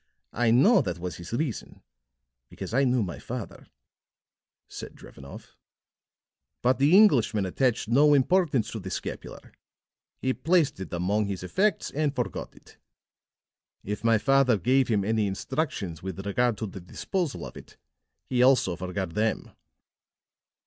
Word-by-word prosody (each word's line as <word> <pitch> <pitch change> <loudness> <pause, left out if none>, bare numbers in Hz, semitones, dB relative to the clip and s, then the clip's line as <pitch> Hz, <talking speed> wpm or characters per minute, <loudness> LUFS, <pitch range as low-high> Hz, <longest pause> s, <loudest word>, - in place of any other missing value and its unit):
I 120 0 +1
know 135 - +5
that 90 -2 -3
was 85 -2 -6
his 85 0 -10
reason, 125 -1 -4 0.7
because - - -8
I 135 +3 +3
knew 125 -2 +2
my 90 -3 -6
father," - - -7 1.0
said - - -9
Drevenoff. 70 0 -13 1.1
"But 130 +2 +2
the 150 +7 +5
Englishman 125 - +4
attached 120 +4 0
no 145 +5 +5
importance 140 - +2
to 110 - -5
the 95 -1 -7
scapular; - - -7 0.7
he 130 0 -1
placed 165 - +1
it 95 - -7
among 100 +5 0
his 95 -2 -5
effects 190 - 0
and 145 -1 -1
forgot 125 -2 -4
it. - - -20 1.0
If 105 +2 -5
my 115 -1 +4
father 135 -1 +3
gave 130 +7 +2
him 105 -4 +1
any 110 -1 +1
instructions 95 - -3
with 95 +1 -6
regard 120 +2 +1
to 110 - -3
the 95 -2 -8
disposal 165 - -4
of - - -10
it, - - -13 0.5
he 125 -1 0
also 125 -8 +4
forgot 90 -1 -4
them." 110 0 -1
115 Hz, 140 wpm, -26 LUFS, 95-135 Hz, 1.1 s, know